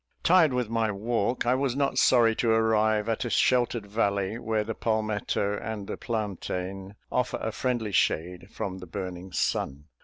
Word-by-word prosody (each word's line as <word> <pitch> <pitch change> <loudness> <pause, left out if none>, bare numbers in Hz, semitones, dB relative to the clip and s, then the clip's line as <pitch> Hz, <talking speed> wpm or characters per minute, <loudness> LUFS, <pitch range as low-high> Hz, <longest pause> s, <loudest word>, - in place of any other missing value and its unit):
Tired 175 -4 +5
with 125 -2 0
my 115 0 0
walk, 115 +3 -1
I 120 - +3
was 130 -1 0
not 140 0 +1
sorry 115 -3 +5
to 115 - +1
arrive 110 -1 +2
at 115 +1 -1
a 120 - -3
sheltered 120 -3 +2
valley, 100 0 -1
where 110 -2 0
the 110 +1 -4
palmetto 105 -2 -1
and 110 -2 -5
the - - -4
plantain 95 -3 -4 0.2
offer 125 - 0
a 110 - -2
friendly 120 -2 -1
shade 90 -1 0
from 95 -1 -4
the 90 - -10
burning 90 0 -6
sun. 70 -1 -2
110 Hz, 165 wpm, -27 LUFS, 100-120 Hz, 0.2 s, Tired